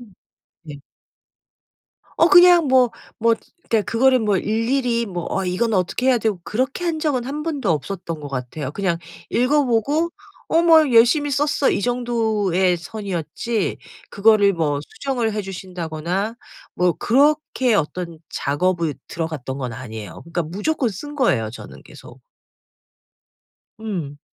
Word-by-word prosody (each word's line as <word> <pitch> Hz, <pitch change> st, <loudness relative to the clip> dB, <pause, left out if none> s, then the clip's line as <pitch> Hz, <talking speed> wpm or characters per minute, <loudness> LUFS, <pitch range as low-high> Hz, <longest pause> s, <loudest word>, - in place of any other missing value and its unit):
음. 225 Hz, -5 st, -15 dB, 0.5 s
네. 150 Hz, -3 st, -9 dB, 1.4 s
어 330 Hz, -, +5 dB
그냥 355 Hz, -3 st, +7 dB
뭐 255 Hz, -3 st, +4 dB, 0.3 s
뭐 230 Hz, 0 st, +3 dB, 0.3 s
그러니까 225 Hz, -2 st, +2 dB
그거를 255 Hz, +3 st, +4 dB
뭐 210 Hz, -3 st, +1 dB
일일이 235 Hz, +3 st, 0 dB
뭐 175 Hz, -3 st, -5 dB
어 195 Hz, -, -1 dB
이거는 200 Hz, +5 st, 0 dB
어떻게 185 Hz, +8 st, -1 dB
해야 250 Hz, -2 st, +4 dB
되고 210 Hz, -5 st, -1 dB
그렇게 260 Hz, +10 st, -2 dB
한 330 Hz, -2 st, -1 dB
적은 285 Hz, -6 st, 0 dB
1 290 Hz, +3 st, -4 dB
번도 285 Hz, -, -2 dB
없었던 165 Hz, 0 st, -3 dB
것 145 Hz, -, -7 dB
같아요. 130 Hz, +2 st, -5 dB
그냥 175 Hz, -1 st, -1 dB, 0.3 s
읽어 280 Hz, +4 st, +2 dB
보고 285 Hz, +8 st, +1 dB, 0.4 s
어 330 Hz, +1 st, +3 dB
뭐 320 Hz, -5 st, +5 dB
"열심히 265 Hz, +6 st, +5 dB
썼어." 290 Hz, 0 st, +1 dB
이 -, -, 0 dB
정도의 220 Hz, -7 st, +1 dB
선이었지 195 Hz, +3 st, -3 dB, 0.3 s
그거를 205 Hz, -1 st, +4 dB
뭐 150 Hz, -4 st, -1 dB
수정을 240 Hz, -, -3 dB
해 210 Hz, 0 st, -2 dB
주신다거나 185 Hz, +2 st, -4 dB, 0.4 s
뭐 180 Hz, -1 st, +2 dB
그렇게 275 Hz, -, +2 dB
어떤 170 Hz, -1 st, -2 dB
작업을 165 Hz, +2 st, 0 dB
들어 165 Hz, -1 st, -3 dB
갔던 135 Hz, -4 st, -6 dB
건 125 Hz, -3 st, -4 dB
아니에요. 110 Hz, -7 st, -8 dB
그러니까 170 Hz, +1 st, -3 dB
무조건 210 Hz, -, -1 dB
쓴 290 Hz, +9 st, -7 dB
거예요 130 Hz, -, +1 dB
저는 120 Hz, -, -11 dB
계속. -, -, -14 dB, 1.6 s
음. 175 Hz, -10 st, -5 dB
215 Hz, 280 characters per minute, -21 LUFS, 170-260 Hz, 1.6 s, 그냥